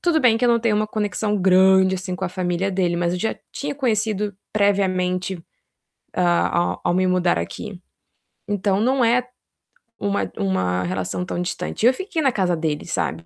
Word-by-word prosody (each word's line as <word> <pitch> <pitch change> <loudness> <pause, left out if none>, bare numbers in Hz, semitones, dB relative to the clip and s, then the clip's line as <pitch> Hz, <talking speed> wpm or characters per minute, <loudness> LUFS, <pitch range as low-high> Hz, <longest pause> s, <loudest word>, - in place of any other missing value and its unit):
tudo 345 -2 +2
bem 240 -6 +4
que 250 - 0
eu 245 - +4
não 235 - +4
tenho 230 -2 +1
uma 215 +1 +1
conexão 210 0 -1
grande, 190 0 +5
assim, 185 0 -4
com 190 - -4
a 180 - -1
família 180 +1 -1
dele, 180 -2 0
mas 170 0 0
eu 180 - -2
já 225 - -2
tinha 285 - -4
conhecido, 215 -6 -1 0.2
previamente, 190 -3 +1 0.7
a 175 -1 +1
ao - - +2
me 185 +1 +2
mudar 180 - +2
aqui, 175 - -6 0.7
então, 200 -1 0
não 255 +3 +2
é 240 +2 +2 0.7
uma 200 0 -1
uma 95 -1 0
relação 95 - -3
tão 175 - -4
distante, 180 +5 -3
eu 250 - +6
fiquei 370 +2 -3
na 270 -4 +3
casa 185 -5 +1
deles, 155 -2 -3
sabe, 80 +1 -2
190 Hz, 175 wpm, -22 LUFS, 175-215 Hz, 0.7 s, eu